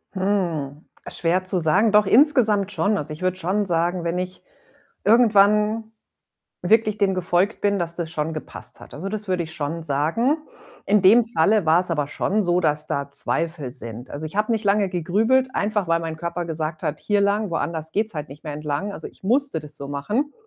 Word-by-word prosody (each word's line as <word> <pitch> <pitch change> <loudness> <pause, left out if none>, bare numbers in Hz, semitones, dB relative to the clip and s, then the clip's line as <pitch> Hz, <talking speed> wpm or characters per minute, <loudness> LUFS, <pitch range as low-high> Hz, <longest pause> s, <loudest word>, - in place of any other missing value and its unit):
Hm, 170 -7 -1 0.2
schwer 175 +2 0
zu 185 0 -2
sagen. 185 +7 +3
Doch 210 0 +5
insgesamt 220 -6 +4
schon. 205 +1 +1
Also, 150 -3 -4
ich 155 - -11
würde 185 0 0
schon 195 +3 -1
sagen, 175 0 0
wenn 170 +1 -1
ich 185 0 -5 0.6
irgendwann, 210 -1 +4 0.8
wirklich 215 +2 +2
dem 195 -2 +2
gefolgt 185 +3 +1
bin, 200 -1 +1
dass 170 -1 -3
das 170 -2 -4
schon 160 -1 -2
gepasst 155 - -9
hat. - - -14
Also, 185 +7 -5
das 215 -1 -5
würde 185 -1 0
ich 160 - -9
schon 160 +2 -4
sagen. 165 - +1 0.5
In 210 0 +3
dem 215 +6 +6
Falle 215 -3 +2
war's 175 +3 +3
aber 150 -4 0
schon 205 +8 -1
so, 175 0 +2
dass 150 -2 0
da 140 -1 -3
Zweifel 155 -3 -2
sind. 115 +1 -6
Also, 145 +2 -5
ich 155 - -12
habe 215 +2 +1
nicht 225 -1 0
lange 200 0 +2
gegrübelt, 220 +9 +1
einfach 205 -3 0
weil 165 0 +2
mein 160 -1 -5
Körper 170 +1 -4
gesagt 155 -1 -4
hat: 150 - -2
„Hier 205 -1 +1
lang, 200 0 +1
woanders 160 -1 -3
geht's 215 0 -1
halt 150 -1 -5
nicht 140 +2 -13
mehr 150 - -5
entlang.“ 150 +6 -3
Also, - - -7
ich - - -19
musste 260 - +2
das 150 0 -11
so 140 -2 -7
machen, 210 - -2
180 Hz, 195 wpm, -23 LUFS, 160-210 Hz, 0.8 s, dem